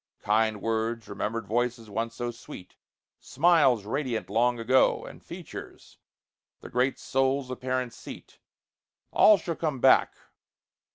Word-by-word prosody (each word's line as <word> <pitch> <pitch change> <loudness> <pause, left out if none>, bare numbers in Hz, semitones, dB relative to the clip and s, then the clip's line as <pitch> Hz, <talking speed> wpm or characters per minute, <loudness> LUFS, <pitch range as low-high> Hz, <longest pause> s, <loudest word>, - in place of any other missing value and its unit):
Kind 110 0 +1
words, 115 0 -2
remembered 115 +1 -4
voices 120 +2 -1
once 115 +3 -4
so 120 0 -3
sweet, 115 -5 -12 0.4
Smiles, 145 - +3
radiant 125 -2 -3
long 120 +3 +2
ago, 130 +3 +2
And - - -12
features, - - -10 0.6
the - - -11
great 125 +2 +1
soul's 135 0 -1
apparent 130 -1 -3
seat: - - -12 0.7
All 215 - +6
shall 170 -1 -4
come 155 -5 -2
back. 130 +1 +4
120 Hz, 120 wpm, -27 LUFS, 115-130 Hz, 0.7 s, All